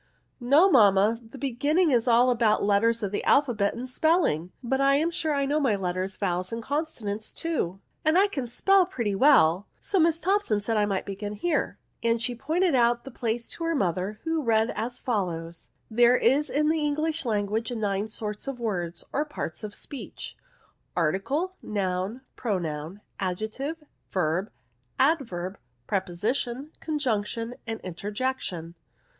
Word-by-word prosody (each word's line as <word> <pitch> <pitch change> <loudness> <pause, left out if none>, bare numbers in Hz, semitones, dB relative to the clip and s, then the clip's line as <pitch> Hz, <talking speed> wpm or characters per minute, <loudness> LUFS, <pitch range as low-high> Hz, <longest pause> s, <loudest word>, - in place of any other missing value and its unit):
" - - -45 0.2
No 345 +6 +8
mamma, 215 - +5
the 270 - -10
beginning 285 +6 +1
is 240 -1 +2
all 245 +1 +5
about 225 -3 +2
the - - +1
letters 225 +3 +2
of 200 - -1
the 205 - -2
alphabet, 240 -8 +2
and 245 +2 -5
spelling; 255 - +1
but 265 +3 0
I 275 0 +5
am 320 +4 +1
sure 315 -3 -1
I 280 0 +1
know 290 +2 +1
my 260 -8 +2
letters, 185 0 -2
vowels, 180 +1 -1
and 230 0 -4
conso 295 -1 -3
nants 210 +2 -3
too, 195 - -2 0.2
and 310 +3 +3
I 390 - +6
can 270 -11 -4
spell 380 +9 +4
pretty 235 - -2
well; 195 - +5
so 390 - 0
Miss 330 0 +3
Thompson 365 - +1
said 225 +2 -1
I 210 -1 +2
might 195 -2 -1
begin 205 +1 -5
here," 300 +10 -1 0.2
and 230 0 +2
she 245 +2 -1
pointed 320 +8 +1
out 240 -1 +3
the 270 - -9
place 235 0 -2
to 335 - -3
her 330 0 +1
mother, 190 - -1
who 325 -1 0
read 225 -3 +2
as 235 +3 -4
follows: 170 -7 -3
— - - -45
" - - -34
There 240 +2 +5
are - - +4
in 295 +4 +2
the 315 -1 +1
English 310 +2 0
lan 210 -5 0
guage 220 +3 -2
nine 205 -3 -1
sorts 210 0 -5
of 270 -3 -4
words, 180 -7 -2
or 290 - +1
parts 295 - -6
of 210 -1 -6
speech: 280 - -8 0.6
article, 265 - 0
noun, 195 +3 -2
pronoun, 175 -4 -3 0.2
adjective, 220 - -3 0.3
verb, 180 +2 0 0.5
adverb, 225 - 0 0.3
preposition, 230 - -2
conjunction, 235 -6 -1
and 225 -1 -3
interjection." 190 -2 -3
230 Hz, 170 wpm, -27 LUFS, 200-285 Hz, 0.6 s, No